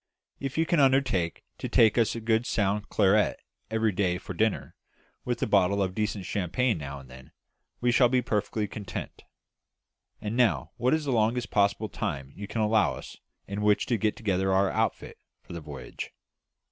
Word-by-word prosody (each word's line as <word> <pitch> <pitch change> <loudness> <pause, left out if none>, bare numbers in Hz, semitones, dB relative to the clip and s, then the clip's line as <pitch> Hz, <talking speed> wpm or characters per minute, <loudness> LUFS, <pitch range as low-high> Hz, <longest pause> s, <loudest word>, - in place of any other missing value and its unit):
If 135 +1 -4
you 165 - +3
can 170 -1 +2
undertake 130 -11 +2 0.2
to - - -3
give 110 -2 +5
us 115 -1 +2
a - - -3
good 115 +1 +1
sound 105 0 0
claret 105 +1 +3 0.3
every 110 0 +1
day 90 -2 0
for 90 - -7
dinner, 110 +4 0 0.5
with - - -1
a - - +3
bottle 100 +3 +3
of 95 -1 -2
decent 105 -2 -2
champagne 100 +3 0
now 70 -1 -6
and 70 -1 -12
then, 65 +1 -14 0.5
we 120 0 +3
shall 120 0 +5
be 125 0 +2
perfectly 105 -1 -1
content. 100 -3 -7 1.0
And 105 +1 -4
now, 125 -2 +2
what 125 +5 +2
is 155 -1 -3
the 140 - 0
longest 120 +1 +1
possible 100 +1 +2
time 70 -12 -4
you 100 0 -7
can 110 - -2
allow 105 -1 +3
us - - -10 0.3
in 100 +1 -4
which 105 0 +3
to 120 - +1
get 105 +1 0
together 95 -3 0
our 95 0 +3
outfit - - -2 0.2
for - - -11
the 85 - -6
voyage?" 75 -2 -7
105 Hz, 185 wpm, -28 LUFS, 95-115 Hz, 1.0 s, give